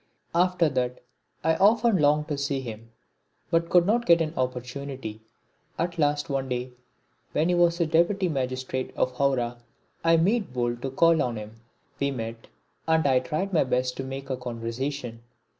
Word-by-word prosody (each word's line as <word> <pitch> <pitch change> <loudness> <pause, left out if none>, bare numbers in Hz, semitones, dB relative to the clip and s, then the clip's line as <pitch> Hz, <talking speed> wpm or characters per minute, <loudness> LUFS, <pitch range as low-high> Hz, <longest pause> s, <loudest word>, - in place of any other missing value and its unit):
After 180 -1 +3
that 125 -3 -1 0.4
I 160 +1 +3
often 220 +2 +4
longed 150 -1 +3
to 145 - -1
see 140 -1 -1
him, 115 -2 -8 0.6
but 165 0 +2
could 175 -1 +5
not 235 +4 +1
get 170 0 +6
an 160 -1 -1
opportunity. 125 -2 -4 0.6
At 170 0 -2
last 145 -1 +1
one 135 -2 -2
day, 125 0 -3 0.6
when 160 +3 +2
he - - +3
was 175 -1 +3
Deputy 170 +4 +2
Magistrate 130 -3 -3
of 130 - +1
Hawrah, 125 -3 0 0.4
I 165 0 +5
made 195 - +1
bold 120 -1 -1
to 135 - -2
call 165 +4 +4
on 120 -2 -1
him. 110 +1 -9 0.4
We 140 - +1
met, 115 -3 -6 0.4
and 160 -1 +3
I 130 -2 +4
tried 155 +9 -3
my 165 - +4
best 125 -1 0
to 135 - -3
make 135 +1 -6
conversation. 120 +1 -4
140 Hz, 160 wpm, -26 LUFS, 125-165 Hz, 0.6 s, get